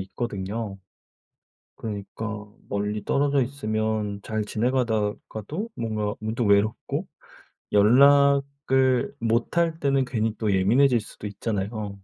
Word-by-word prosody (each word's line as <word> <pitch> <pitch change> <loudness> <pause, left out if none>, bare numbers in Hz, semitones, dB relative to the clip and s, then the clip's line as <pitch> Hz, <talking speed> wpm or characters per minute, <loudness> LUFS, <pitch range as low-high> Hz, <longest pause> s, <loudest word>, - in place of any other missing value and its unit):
있거든요. 100 0 -4 1.0
그러니까 105 0 -5 0.2
멀리 105 +1 -2
떨어져 140 0 +2
있으면 110 -5 -2
잘 110 -1 -2
지내가다가도 115 - -2
뭔가 110 -2 -2
문득 110 +2 -2
외롭고 100 +2 +1 0.7
연락을 140 +2 +4
못할 160 +9 +1
때는 135 -2 +2
괜히 110 -3 -1
또 105 -3 0
예민해질 120 +6 +4
수도 105 - -9
있잖아요. 105 +1 -3
110 Hz, 250 characters per minute, -25 LUFS, 105-130 Hz, 1.0 s, 연락을